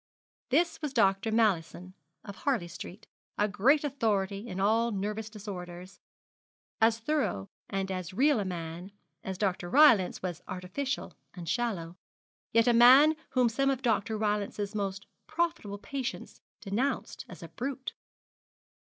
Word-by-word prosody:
This 330 +6 +1
was 300 -3 -3
Dr. 195 +1 +2
Mallison, 185 -4 0 0.3
of 200 -2 -8
Harley 250 -11 0
Street, 185 +3 -9 0.3
a 210 - +2
great 260 +9 +3
authority 210 -7 -1
in 185 -2 -5
all 225 +4 +3
nervous 210 +2 -3
disorders 185 -4 -8 0.8
as 225 0 +4
thorough 230 - -1 0.2
and 195 0 -2
as 185 -1 -4
real 270 +5 +3
a - - 0
man 175 +1 -6 0.3
as 190 -1 -4
Dr. 185 -3 -1
Rylance 235 -11 +5
was 180 -2 -4
artificial 230 +10 -4 0.2
and 175 -2 -8
shallow, 190 -8 -2 0.5
yet 230 +1 +4
a 240 - +5
man 260 +7 +8
whom 250 -2 +3
some 275 +4 +1
of 270 -1 -1
Dr. 220 -2 +1
Rylance's 210 -1 -1
most 200 -1 -3 0.2
profitable 320 -11 -2
patients 265 +4 -5 0.2
denounced 225 +8 -2
as - - -10
a - - -9
brute. 265 +1 -5
210 Hz, 135 wpm, -29 LUFS, 190-250 Hz, 0.8 s, man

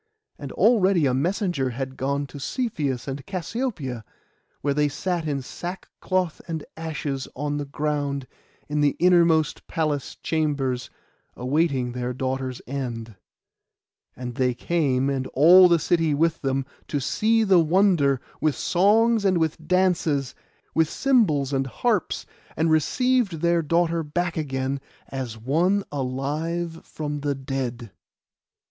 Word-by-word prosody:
And 140 -2 -6
already 195 -6 +4
a 130 - +2
messenger 170 - 0
had 130 +2 -5
gone 140 +2 -1
to 140 +1 -10
Cepheus 145 - -2
and 135 0 -4
Cassiopoeia, 180 - -3 0.6
where 140 0 +1
they 150 0 +2
sat 170 +3 -2
in 140 -3 -2
sackcloth 180 +2 -3
and 160 -3 -4
ashes 150 -4 -4
on 145 +2 -2
the 145 -1 -4
ground, 145 -2 -2 0.4
in 150 0 0
the 145 -1 +3
innermost 170 -3 +3
palace 150 -4 -2
chambers, 140 -6 -1 0.5
awaiting 130 -1 0
their 125 0 -3
daughter's 130 0 -3
end. 120 -5 -5 1.0
And 125 -1 -6
they 125 0 +1
came, 135 -3 +1
and 135 -2 -1
all 175 +7 +8
the 170 -1 +4
city 165 -2 +1
with 165 +2 +1
them, 135 -1 0 0.2
to 145 - -1
see 220 - +2
the 195 -4 +5
wonder, 165 -5 +3 0.2
with 155 -2 +1
songs 220 +4 +3
and 190 -3 +3
with 160 -1 -1
dances, 170 -7 +1 0.4
with 160 -1 +2
cymbals 160 - +2
and 135 0 0
harps, 125 - -1 0.3
and 160 0 +2
received 200 - +2
their 170 0 +3
daughter 170 +1 +1
back 175 +3 -2
again, 135 -2 -2 0.3
as 130 -4 -5
one 170 - +1
alive 150 +6 -3
from 150 -1 -5
the 145 0 -1
dead. 130 -4 -4
150 Hz, 130 wpm, -24 LUFS, 135-175 Hz, 1.0 s, all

